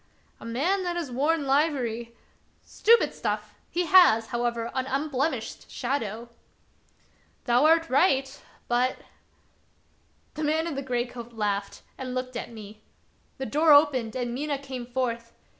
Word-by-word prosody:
"A - - -11
man 300 +13 0
that 355 -1 -2
has 335 -7 -4
worn 290 +4 +1
livery" 255 -5 0 0.2
— - - -38
" - - -39
Stupid 460 +2 +3
stuff! - - -3 0.2
he 355 +1 -1
has, 230 -12 +6
however, 235 -1 -2
an 260 0 -2
unblemished 275 +2 -2
shadow." 235 -3 -3 0.5
" - - -37
Thou 245 +3 +3
art 330 +1 +4
right, 270 -2 +2 0.3
but" 245 +2 +1 0.7
— - - -40
The 310 - -5
man 315 +2 +1
in 335 - -3
the 275 - -3
gray 245 -3 -1
coat 240 -1 -10
laughed 205 -2 -3 0.2
and 255 -1 -5
looked 255 0 -4
at 235 - -5
me. 215 -1 -11 0.6
The 265 - -4
door 305 +3 +4
opened 265 -6 +4
and 245 -2 -2
Mina 285 +2 -2
came 260 -3 -7
forth. 235 -2 -3
260 Hz, 155 wpm, -26 LUFS, 235-300 Hz, 0.7 s, has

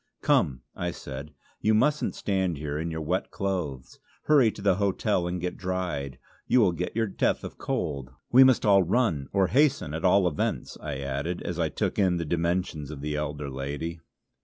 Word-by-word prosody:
"Come," 65 -3 +2
I - - -2
said, 70 +2 -7 0.3
"you 110 0 +3
mustn't 150 +7 +2
stand 95 -5 -1
here 75 0 -3
in 85 +1 -2
your 80 -1 -4
wet 90 +5 -1
clothes. 85 -10 -4 0.2
Hurry 140 -7 +5
to - - -10
the 100 -2 +3
hotel 100 -2 +1
and 90 +1 -2
get 90 +1 -3
dried. 90 -8 -3 0.3
You 125 - +4
will 100 -6 +5
get 90 +4 -4
your 115 0 +2
death 100 - 0
of - - -8
cold. 70 -3 -2 0.2
We 130 +2 +9
must 130 -3 +4
all 100 -2 +6
run! 90 - +1
Or 100 -1 +3
hasten, 140 - +2
at 80 - -4
all 95 0 +5
events!" 75 - -2
I 75 -2 -4
added, 70 +6 -3
as 90 -1 -4
I 80 -2 +1
took - - -2
in 90 -3 +3
the 85 - -2
dimensions 85 -2 -1
of 75 -3 -7
the 75 +1 -2
elder 75 -1 -3
lady. 70 +5 -4
85 Hz, 190 wpm, -27 LUFS, 75-100 Hz, 0.3 s, We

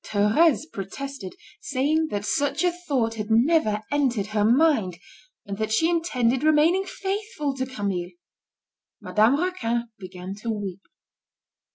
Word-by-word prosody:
Thérèse 220 +11 +3
protested, 200 +1 -6 0.3
saying 295 +4 +1
that 205 -6 -3
such 285 - 0
a 355 - +3
thought 280 -10 -1
had 210 -1 -5
never 225 -2 +3
entered 260 -8 +1
her 210 -1 +2
mind, 235 - +3 0.5
and 200 0 -6
that 220 0 -1
she 325 +10 +3
intended 260 -8 +1
remaining 310 +5 +3
faithful 390 -8 -3
to 260 -1 -3
Camille. 200 -8 -3 0.9
Madame 225 +7 +3
Raquin 240 -10 -1
began 185 0 -8
to 230 +3 -5
weep. 200 -4 -4
250 Hz, 130 wpm, -25 LUFS, 210-310 Hz, 0.9 s, Thérèse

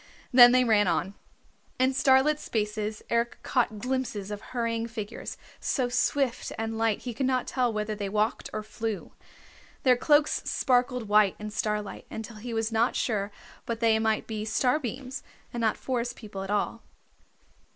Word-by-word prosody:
Then 245 -1 +10
they 255 0 +5
ran 215 -4 +4
on. 190 +2 0 0.6
In 260 +1 +3
starlit 270 +2 +4
spaces 210 -2 -2
Eric 235 0 +1
caught 235 -4 +1
glimpses 235 -4 -3
of 205 0 -5
hurrying 230 -1 -2
figures, 225 -1 -6 0.2
so 255 -3 0
swift 250 +1 0
and 225 0 -3
light 225 -2 +1
he 245 - -4
could 260 +3 -1
not 255 -1 +1
tell 250 -2 0
whether 215 0 -2
they 205 -2 -4
walked 210 +2 0
or 215 - -4
flew. 220 -2 -4 0.7
Their 255 -2 +6
cloaks 295 +4 +3
sparkled 250 -2 +1
white 210 -2 +4
in 210 0 -6
starlight 210 0 -3
until 225 0 -7
he 235 +3 -6
was 225 0 -1
not 230 +2 +2
sure 205 -3 -1 0.4
but 230 -1 -2
they 225 -1 +3
might 220 -1 +1
be 215 -1 -4
starbeams, 255 +3 -1 0.3
and 240 - -3
not 220 -2 +2
Forest 245 -1 -2
People 205 -4 -8
at 195 - -6
all. 210 +2 -1
225 Hz, 160 wpm, -28 LUFS, 215-250 Hz, 0.7 s, Then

